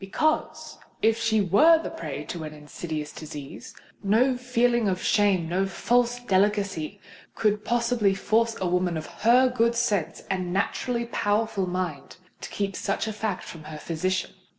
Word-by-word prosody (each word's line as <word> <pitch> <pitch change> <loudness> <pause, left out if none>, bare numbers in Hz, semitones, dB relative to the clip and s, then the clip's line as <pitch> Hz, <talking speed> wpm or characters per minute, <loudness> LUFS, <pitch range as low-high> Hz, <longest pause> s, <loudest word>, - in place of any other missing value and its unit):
Because, 310 +11 -1 0.2
if 225 +1 +3
she 220 -2 +2
were 295 - +6
the 325 - -5
prey 320 - -5
to 165 +1 -6
an 155 0 -7
insidious 150 0 -6
disease, 150 -3 -9 0.3
no 235 +6 +3
feeling 245 -2 +1
of 185 -1 0
shame—no 190 -3 +2
false 240 +5 +1
delicacy 200 -4 0 0.4
could 210 -1 +1
possibly 235 -4 +1
force 225 +3 +1
a 190 - -1
woman 180 -1 +1
of 155 - -5
her 240 - +4
good 235 -2 +1
sense 210 -8 0
and 185 -2 -2
naturally 235 +5 -1
powerful 205 -3 0
mind 180 -5 -4 0.2
to - - -6
keep 195 -2 -3
such - - -1
a 220 - -3
fact 215 -3 -3
from 160 -2 -10
her 155 0 -7
physician. 185 +4 -2
205 Hz, 150 wpm, -26 LUFS, 180-235 Hz, 0.4 s, were